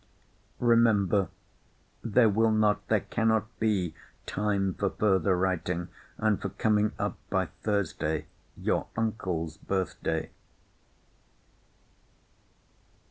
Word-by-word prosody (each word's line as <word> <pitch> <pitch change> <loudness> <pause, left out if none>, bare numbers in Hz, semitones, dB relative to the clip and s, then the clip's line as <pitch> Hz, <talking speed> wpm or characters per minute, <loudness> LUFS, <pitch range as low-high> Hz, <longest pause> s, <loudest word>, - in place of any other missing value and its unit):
Remember, 110 -5 +3 0.8
there 115 +1 +4
will 110 +2 +3
not, 110 -1 +2
there - - +2
cannot 110 0 0
be 95 -7 +1 0.3
time 100 -2 0
for 100 - 0
further 95 -3 +2
writing, 90 -1 -1 0.3
and 110 -2 +1
for 100 - -2
coming 105 +2 +1
up 105 0 -2
by 95 -4 0
Thursday, 95 -7 -1 0.3
your - - 0
uncle's 90 -8 -2
birth 95 +2 -2
day. 80 -1 -2
100 Hz, 95 wpm, -28 LUFS, 95-110 Hz, 0.8 s, there